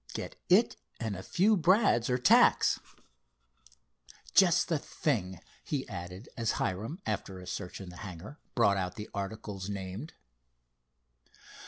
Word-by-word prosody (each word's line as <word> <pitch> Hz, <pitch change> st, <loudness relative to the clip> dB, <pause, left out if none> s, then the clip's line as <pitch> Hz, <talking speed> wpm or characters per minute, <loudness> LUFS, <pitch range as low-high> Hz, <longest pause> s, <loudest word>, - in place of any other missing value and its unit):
Get -, -, -5 dB
it, -, -, +4 dB, 0.2 s
and 110 Hz, -3 st, -2 dB
a 95 Hz, -, -6 dB
few 200 Hz, -, +3 dB
brads, 175 Hz, -, +3 dB
or 125 Hz, -, +2 dB
tacks. 125 Hz, -, +5 dB, 1.5 s
Just 180 Hz, -4 st, +5 dB
the 165 Hz, -3 st, 0 dB
thing," 95 Hz, -, -2 dB, 0.2 s
he 140 Hz, -3 st, -3 dB
added, 90 Hz, 0 st, -7 dB
as 115 Hz, -3 st, 0 dB
Hiram, 110 Hz, -, -2 dB
after 95 Hz, -3 st, -3 dB
a 90 Hz, -, -10 dB
search 90 Hz, 0 st, -5 dB
in 95 Hz, -2 st, -8 dB
the 90 Hz, -, -11 dB
hangar, 100 Hz, -, -9 dB, 0.2 s
brought 100 Hz, -5 st, +4 dB
out 90 Hz, -1 st, -2 dB
the 105 Hz, -, -8 dB
articles 100 Hz, -1 st, -5 dB
named. 100 Hz, +8 st, -6 dB
105 Hz, 135 wpm, -31 LUFS, 95-135 Hz, 1.5 s, tacks